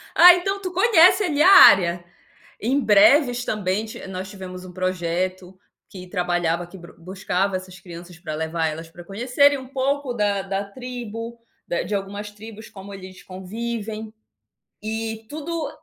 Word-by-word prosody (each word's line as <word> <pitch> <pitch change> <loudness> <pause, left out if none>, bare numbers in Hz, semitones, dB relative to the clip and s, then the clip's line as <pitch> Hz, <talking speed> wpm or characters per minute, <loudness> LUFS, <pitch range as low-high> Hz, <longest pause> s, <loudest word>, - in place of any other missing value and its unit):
Ah, 355 0 +9
então 390 +3 -3
tu 370 -2 -4
conhece 375 0 +5
ali 300 -6 0
a 375 - +7
área. 175 - +7 0.6
Em 260 +6 0
Breves 245 +3 +4
também, 210 0 -2 0.2
nós 190 +1 -6
tivemos 185 -2 -9
um 180 - -11
projeto 185 0 -3 0.3
que 185 -2 -11
trabalhava, 175 -2 -1
que 190 - -13
brus 170 -1 -15
buscava 185 +2 -2
essas 185 0 -7
crianças 175 -1 -12
para 155 -4 -6
levar 160 +1 -2
elas 160 +1 -6
para 175 +1 -13
conhecerem 250 +9 +2
um 260 -1 -10
pouco 275 -1 -2
da 205 -3 0
da 195 0 -3
tribo, 235 0 -8 0.3
da 175 - -2
de 210 - -3
algumas 200 +1 -5
tribos 215 +1 -12
como 200 0 -11
eles 185 -1 -11
convivem, 220 +3 -6 0.7
e 220 0 -5
tudo 315 +1 -4
200 Hz, 150 wpm, -22 LUFS, 185-245 Hz, 0.7 s, Ah